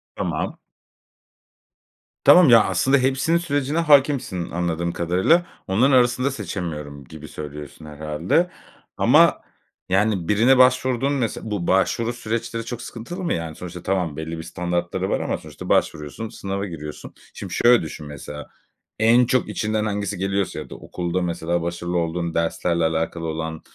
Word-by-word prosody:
Tamam. - - -3 1.6
Tamam 175 -6 +8
ya, 115 -2 +8
aslında 130 +10 +2
hepsinin 135 +6 +2
sürecine 145 -3 -1
hâkimsin 135 - +2
anladığım 85 0 -1
kadarıyla, 95 - +2 0.2
“Onların 120 +9 +3
arasında 125 +1 +3
seçemiyorum.“ 80 - -6
gibi 80 +3 -11
söylüyorsun 75 +1 -9
herhâlde. 75 - -1 0.5
Ama, - - +5 0.5
yani 95 -2 +1
birine 115 +6 +4
başvurduğun 130 +1 +3
mes 125 -6 -1
bu 105 -6 -4
başvuru 115 +5 +1
süreçleri 115 0 -4
çok 120 0 -6
sıkıntılı 125 +13 -7
mı? 170 - 0
Yani 80 -2 -4
sonuçta 90 -1 -8
tamam, 90 -6 -1
belli 80 +1 -5
bir 80 - -6
standartları 90 +2 -2
var - - 0
ama - - -2
sonuçta - - -10
başvuruyorsun, 75 +9 0
sınava 100 0 -4
giriyorsun. 75 -5 -8 0.2
Şimdi - - -7
şöyle 120 0 +5
düşün 75 -1 -7
mesela, 75 0 -8 0.5
en 120 +3 +5
çok 130 +1 +1
içinden 110 0 -1
hangisi 100 -2 -2
geliyorsa 95 +1 -1
ya - - -8
da - - -8
okulda 90 +1 -3
mesela 85 0 -1
başarılı 85 +1 -3
olduğun 85 0 -2
derslerle 85 0 0
alakalı 80 +1 -1
olan, 80 0 -4
95 Hz, 140 wpm, -22 LUFS, 85-120 Hz, 1.6 s, Tamam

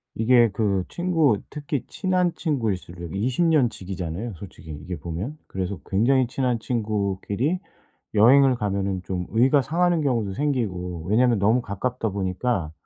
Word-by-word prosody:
이게 120 0 +4
그 100 -3 +1
친구 165 - +2
특히 145 -2 -4
친한 180 -2 0
친구일수록 95 - -3
20 125 - +1
년 150 -7 +4
지기잖아요 95 +1 -5
솔직히 85 -2 -12
이게 85 +5 -6
보면? 90 - -5
그래서 95 -1 -4
굉장히 125 +6 +3
친한 125 -1 -1
친구끼리 110 - -1 0.6
여행을 130 +5 +6
가면은 100 -4 -2
좀 90 -1 -4
의가 130 +6 +4
상하는 170 +5 +1
경우도 115 -9 0
생기고 95 - -2
왜냐하면 120 +2 +3
너무 110 +5 +3
가깝다 115 +3 -3
보니까 95 -2 -2
110 Hz, 320 characters per minute, -24 LUFS, 95-130 Hz, 0.6 s, 여행을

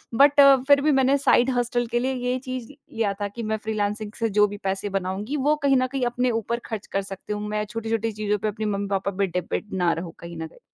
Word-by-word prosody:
But 285 +3 +5 0.3
फिर 285 -1 +6
भी 305 +1 +3
मैंने 270 +1 +3
साइड 265 -2 +4
हस्टल 240 0 0
के 240 +1 0
लिए 260 +2 0
ये 250 0 -1
चीज़ 255 0 -5
लिया 225 -7 -3
था 205 - 0
कि 230 +3 -7
मैं 220 0 -1
फ़्रीलांसिंग 210 0 -2
से 230 -1 +1
जो 210 - +6
भी 205 0 -7
पैसे 195 +1 -1
बनाऊँगी 195 +7 -3
वो 295 +2 +2
कहीं 275 -2 +4
न 255 - +2
कहीं 265 -3 -1
अपने 245 +1 0
ऊपर 235 +3 -3
खर्च 220 -3 -5
कर 195 - -1
सकती 195 +1 -6
हूँ। 210 0 -4
मैं 210 0 -1
छोटी-छोटी 225 +1 -2
चीज़ों 210 0 -1
पे 205 - -2
अपने 215 +1 -3
मम्मी 200 -1 -1
पापा 195 0 0
पे 200 -1 +2
डिपेंड 180 +4 -4
ना 175 -2 +2
रहूँ 165 0 -6
कहीं 170 0 -9
न 160 0 -4
कहीं। - - -20
220 Hz, 245 wpm, -24 LUFS, 200-250 Hz, 0.3 s, फिर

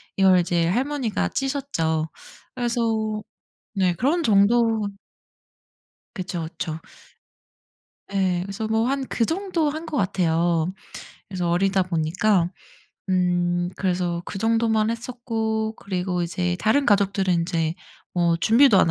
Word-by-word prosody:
이걸 190 -2 +5
이제 170 -1 +1
할머니가 255 +3 0
찌셨죠. 255 - -1 0.5
그래서 225 -3 -1 0.5
네 185 -3 +2
그런 290 - +1
정도로 220 -1 +3 1.3
그쵸, 180 -4 -4
그쵸. 160 -1 -5 1.3
예. 185 -2 +1
그래서 200 +3 -4
뭐 220 +1 +1
한 275 0 -1
그 230 - 0
정도 340 - 0
한 315 +3 -5
것 305 - -3
같아요. 175 -3 +1 0.5
그래서 180 -3 -2
어리다 190 +2 +2
보니까 175 +2 +1 0.6
음 175 -1 +1
그래서 180 -2 -1
그 195 - -6
정도만 225 0 +2
했었고 225 -2 -2
그리고 180 -2 -2
이제 175 +1 -1
다른 220 +10 +2
가족들은 200 -2 +2
인제 165 -1 0 0.4
어 170 -1 +2
준비도 225 +4 +5
안 165 - +4
195 Hz, 240 characters per minute, -23 LUFS, 175-230 Hz, 1.3 s, 이걸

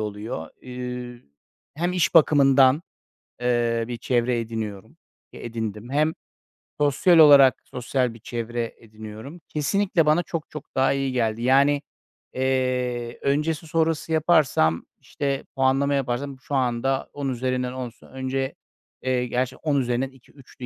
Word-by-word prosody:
oluyor. 105 -5 -5
Eee, 125 -1 -7 0.5
hem 175 +4 -1
iş 175 -4 +1
bakımından, 140 -2 +5 0.6
eee, 120 -1 +1
bir 120 - -4
çevre 120 0 0
ediniyorum, 110 -4 -6 0.4
ki - - -11
edindim 115 0 -5
hem 155 +3 +2 0.7
sosyal 150 +4 +4
olarak 140 -5 +7
sosyal 125 0 -2
bir 115 - -13
çevre 115 +1 -4
ediniyorum. 110 +8 -10
Kesinlikle 170 +2 +1
bana 155 +3 +3
çok 165 -2 -5
çok 150 -1 -10
daha 135 +1 +3
iyi 135 -1 -1
geldi. 115 -2 0
Yani, 140 +3 +4 0.5
eee, 125 -2 -1
öncesi 150 +3 0
sonrası 160 0 0
yaparsam, 155 - +2
işte, 140 -1 -3
puanlama 135 +2 +2
yaparsam 135 +1 -2
şu 140 - -4
anda 130 +1 0
10 140 -2 -3
üzerinden 125 0 -2
10'sa 125 -3 -8
önce, 130 0 -3 0.5
eee, 130 -1 0
gerçi 125 +2 -1
10 145 -3 0
üzerinden 125 +2 -1
2-3'tü. 130 -1 -14
130 Hz, 130 wpm, -24 LUFS, 120-145 Hz, 0.7 s, olarak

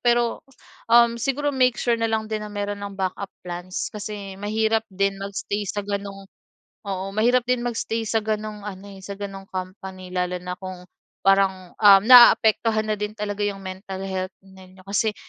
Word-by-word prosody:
pero, 240 -1 +2 0.5
um, 235 0 +6
siguro 285 +4 0
make 255 -2 +3
sure 235 -1 +1
na 225 - +1
lang 220 -1 0
din 215 -1 -2
na 210 - -6
mayro'n 205 0 -3
ng 200 -1 -6
backup 190 +1 -3 0.2
plans 180 +1 -5
kasi 205 -1 -6
mahirap 220 +1 +1
din 195 0 -1
mag-stay 200 +1 -3
sa 205 +1 -3
ganong 200 -1 -5 0.6
oo 190 -1 -3
mahirap 240 +3 +3
din 250 -1 +2
mag-stay 230 -1 -2
sa 225 - +1
ganong 215 -1 -3
ano, 200 -1 -7
eh, - - -12
sa 200 - -6
ganong 195 -1 -6
company 185 0 -7
lalo 180 0 -1
na 180 0 -5
kung 185 -1 -8 0.4
parang 190 -2 +2
uhm 200 -2 +7
naaapektuhan 225 -3 +7
na 215 - +1
din 210 0 -3
talaga 205 -1 -3
yung 200 -1 -3
mental 190 0 -6
health 185 -1 -4
ninyo. 190 -1 -16
Kasi 210 +2 0
200 Hz, 175 wpm, -23 LUFS, 190-220 Hz, 0.6 s, uhm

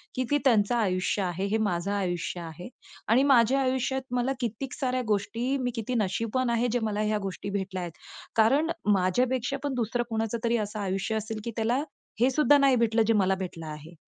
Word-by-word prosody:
की 255 - 0
ती 290 - +5
त्यांचं 225 -2 +4
आयुष्य 195 -3 0
आहे, 180 +2 -2
हे 215 +2 +1
माझं 200 -3 -1
आयुष्य 180 -3 -2
आहे. 165 +3 -8 0.4
आणि 240 +5 +4
माझ्या 265 -1 +4
आयुष्यात 265 0 0
मला 250 +2 +1
कित्येक 240 +2 -4
साऱ्या 255 -2 -1
गोष्टी 230 +6 0
मी 250 -1 -1
किती 230 +2 -3
नशीबवान 230 +5 0
आहे 235 +1 +1
जे 245 - +1
मला 210 -1 -1
ह्या 215 0 +1
गोष्टी 195 +1 -5
भेटल्या 190 -2 -3
आहेत. 170 -2 -8 0.4
कारण 275 +9 +3 0.2
माझ्यापेक्षा 245 +8 +1
पण 285 -2 -1
दुसरं 240 0 0
कोणाचं 225 +1 -1
तरी 235 0 +2
असं 210 0 -3
आयुष्य 195 +3 -2
असेल 220 0 -3
की 235 - -4
त्याला 235 +5 +1 0.4
हे 250 +3 +4
सुद्धा 290 +1 +5
नाही 275 -2 +4
भेटलं 230 -1 +2
जे 225 - +4
मला 190 -2 +3
भेटलं 170 -3 -6
आहे. 155 +2 -9
225 Hz, 190 wpm, -27 LUFS, 195-250 Hz, 0.4 s, ती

